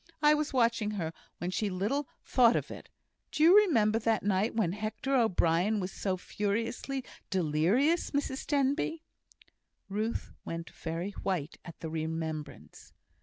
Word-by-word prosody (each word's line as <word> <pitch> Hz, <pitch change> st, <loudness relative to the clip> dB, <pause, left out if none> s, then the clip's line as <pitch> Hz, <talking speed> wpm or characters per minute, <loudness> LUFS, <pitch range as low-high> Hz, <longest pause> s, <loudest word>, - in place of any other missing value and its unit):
I 300 Hz, 0 st, +7 dB
was 300 Hz, -1 st, 0 dB
watching 230 Hz, -4 st, +2 dB
her 165 Hz, -3 st, -3 dB, 0.2 s
when 175 Hz, +2 st, -3 dB
she 210 Hz, +2 st, 0 dB
little 210 Hz, +10 st, -1 dB, 0.2 s
thought 240 Hz, -2 st, +5 dB
it. -, -, -4 dB, 0.4 s
Do 305 Hz, -, +1 dB
you 345 Hz, +4 st, +8 dB
remember 225 Hz, -, +4 dB
that 225 Hz, -1 st, +1 dB
night 200 Hz, +3 st, +1 dB
when 210 Hz, -7 st, +1 dB
Hector 215 Hz, +7 st, -3 dB
O'Brien 205 Hz, -3 st, +2 dB
was 185 Hz, 0 st, -3 dB
so 190 Hz, -2 st, -2 dB
furiously 225 Hz, +8 st, -2 dB, 0.3 s
delirious, 190 Hz, -, +2 dB
Mrs 280 Hz, -2 st, -2 dB
Denbigh?" 285 Hz, +3 st, +1 dB, 0.9 s
Ruth 215 Hz, +3 st, -2 dB
went 165 Hz, 0 st, -6 dB
very 170 Hz, +4 st, -4 dB
white 180 Hz, -6 st, -3 dB
at 170 Hz, -, -11 dB
the 160 Hz, -, -4 dB
remembrance. 160 Hz, -2 st, -5 dB
210 Hz, 135 wpm, -30 LUFS, 175-260 Hz, 0.9 s, you